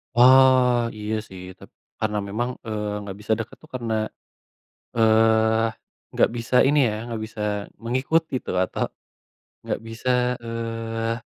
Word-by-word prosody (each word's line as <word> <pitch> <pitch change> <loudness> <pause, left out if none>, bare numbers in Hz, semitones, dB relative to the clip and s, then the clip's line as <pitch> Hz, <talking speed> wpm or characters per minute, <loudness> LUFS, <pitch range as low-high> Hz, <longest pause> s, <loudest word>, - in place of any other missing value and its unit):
Wah, 125 -1 +6
iya 105 +1 -3
sih. 95 -1 -10 0.2
Tap - - -14 0.3
karena 105 -1 -1
memang, 120 +5 -2 0.2
eee, 105 -1 -2
enggak 100 -1 -7
bisa 110 +1 0
deket 115 - -6
tuh 155 - -17
karena, 115 -3 -2 1.0
eee, 110 0 +4 0.5
enggak - - +3
bisa 115 +1 -4
ini 145 +1 +3
ya, - - -2 0.2
enggak 115 -2 -4
bisa 110 0 -10 0.4
mengikuti 135 +7 0
itu, - - -5
atau, - - -2 0.8
enggak - - -2
bisa, 115 +3 -3 0.3
eee, 115 0 -3
115 Hz, 135 wpm, -24 LUFS, 110-125 Hz, 1.0 s, Wah